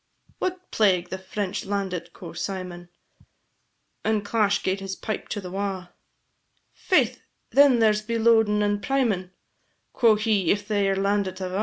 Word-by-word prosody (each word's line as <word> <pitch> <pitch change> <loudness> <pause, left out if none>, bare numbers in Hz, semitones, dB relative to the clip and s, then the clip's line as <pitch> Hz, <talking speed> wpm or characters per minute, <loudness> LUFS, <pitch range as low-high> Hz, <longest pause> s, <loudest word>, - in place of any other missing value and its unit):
"What 370 0 -4
plague, 185 -5 +2
the 190 - -5
French 190 0 -4
landit!" 190 -4 -3
quo' 170 -1 -10
Symon, 180 -3 -5 1.1
And 215 -2 0
clash 210 -2 +1
gaed 190 +1 0
his 195 -1 -5
pipe 215 +1 -5
to 205 - -3
the 180 -2 -8
wa', 190 -2 -3 0.8
"Faith, - - +1 0.3
then 280 -3 +6
there's 215 -2 +3
be 230 +2 -2
loadin' 220 -2 +4
and 205 0 0
primin'," 230 -10 0 0.6
Quo' 230 -3 +5
he, 210 -5 +1
"if 205 +1 +1
they 205 -2 +1
're 195 - +1
landit 195 -1 0
ava. 185 +1 -3
200 Hz, 150 wpm, -25 LUFS, 190-215 Hz, 1.1 s, then